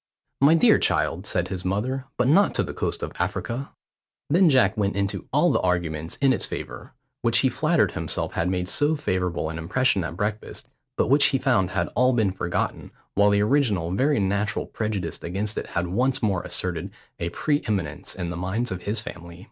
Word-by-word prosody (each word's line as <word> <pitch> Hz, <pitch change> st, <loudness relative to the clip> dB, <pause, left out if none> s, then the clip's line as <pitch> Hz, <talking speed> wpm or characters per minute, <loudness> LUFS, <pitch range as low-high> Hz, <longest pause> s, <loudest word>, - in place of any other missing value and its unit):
"My 145 Hz, +4 st, +6 dB
dear 165 Hz, -, +5 dB
child," 90 Hz, +6 st, 0 dB
said 90 Hz, 0 st, -1 dB
his 95 Hz, -1 st, -4 dB
mother, 125 Hz, +8 st, -2 dB
"but 125 Hz, -, +2 dB
not 195 Hz, +9 st, +4 dB
to -, -, +1 dB
the -, -, -6 dB
coast -, -, -3 dB
of -, -, -3 dB
Africa." 125 Hz, +4 st, -2 dB, 0.6 s
Then 175 Hz, +2 st, +5 dB
Jack 130 Hz, -5 st, +4 dB
went 100 Hz, -3 st, 0 dB
into 100 Hz, 0 st, -2 dB
all -, -, +3 dB
the -, -, +2 dB
arguments 85 Hz, -3 st, -1 dB
in 135 Hz, -2 st, +3 dB
its -, -, -1 dB
favour, -, -, -7 dB, 0.3 s
which -, -, +3 dB
he -, -, +3 dB
flattered -, -, +2 dB
himself -, -, -3 dB
had 85 Hz, -, 0 dB
made 90 Hz, -1 st, -1 dB
so 145 Hz, -, +2 dB
favourable 90 Hz, -, -1 dB
an 80 Hz, -, -6 dB
impression 100 Hz, +3 st, +1 dB
at 85 Hz, +1 st, -5 dB
breakfast, 105 Hz, +2 st, -3 dB, 0.3 s
but -, -, +3 dB
which 140 Hz, +4 st, +5 dB
he 135 Hz, -, +3 dB
found 120 Hz, -9 st, +2 dB
had -, -, -1 dB
all 125 Hz, +2 st, +2 dB
been 110 Hz, -5 st, +2 dB
forgotten, 90 Hz, -2 st, -3 dB, 0.2 s
while 100 Hz, +1 st, +4 dB
the 100 Hz, 0 st, +3 dB
original 105 Hz, -, +1 dB
very 135 Hz, +8 st, +2 dB
natural 100 Hz, +3 st, 0 dB
prejudice 105 Hz, -6 st, -3 dB
against 100 Hz, +5 st, -3 dB
it -, -, -4 dB
had 85 Hz, -, -2 dB
once 125 Hz, +9 st, 0 dB
more 95 Hz, -5 st, +1 dB
asserted 90 Hz, 0 st, -3 dB, 0.3 s
a 85 Hz, -, -2 dB
pre 145 Hz, -, 0 dB
eminence 95 Hz, -9 st, -3 dB
in 90 Hz, -2 st, -4 dB
the -, -, -4 dB
minds 95 Hz, +7 st, -2 dB
of 90 Hz, -1 st, -4 dB
his 105 Hz, +3 st, 0 dB
family. 85 Hz, -4 st, -9 dB
100 Hz, 195 wpm, -24 LUFS, 90-125 Hz, 0.6 s, My